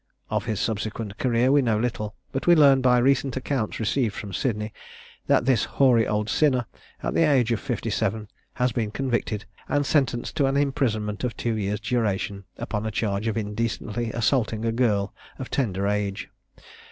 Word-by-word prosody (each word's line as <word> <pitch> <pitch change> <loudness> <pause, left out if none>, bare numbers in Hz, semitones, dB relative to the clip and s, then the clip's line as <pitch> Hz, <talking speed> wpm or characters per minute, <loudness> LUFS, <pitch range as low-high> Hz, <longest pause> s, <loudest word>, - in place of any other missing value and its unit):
Of - - 0
his 110 -3 -2
subsequent 110 -1 -3
career 125 0 +2
we 145 0 +5
know 115 -4 +1
little, 110 -3 -2 0.2
but 135 - -3
we 175 - +8
learn 140 -4 +6
by 125 -1 +4
recent 135 +1 +2
accounts 130 -4 -2
received 110 0 0
from 100 -2 -6
Sydney, 105 0 -2 0.5
that - - +3
this 125 -5 +3
hoary 125 -5 +5
old 105 0 0
sinner, 130 -2 +2 0.4
at - - -1
the - - +2
age 135 -7 +3
of 115 - +1
fifty 120 -4 -3
seven, 105 0 -1 0.3
has 125 0 +1
been 110 -2 -1
convicted 120 -3 -2 0.2
and 145 0 +1
sentenced 135 -4 0
to 140 -4 +3
an 135 +1 +1
imprisonment 110 -7 0
of 120 -2 -2
two 115 -2 -1
years' 105 0 -2
duration, 105 -4 -1
upon 105 +2 -3
a - - -2
charge 105 0 -1
of 110 - -1
indecently 110 +1 -2
assaulting 115 -1 0
a 115 - +1
girl 105 -4 +1 0.2
of 130 - -7
tender 100 -8 0
age. 100 -1 -2
115 Hz, 175 wpm, -25 LUFS, 105-130 Hz, 0.5 s, we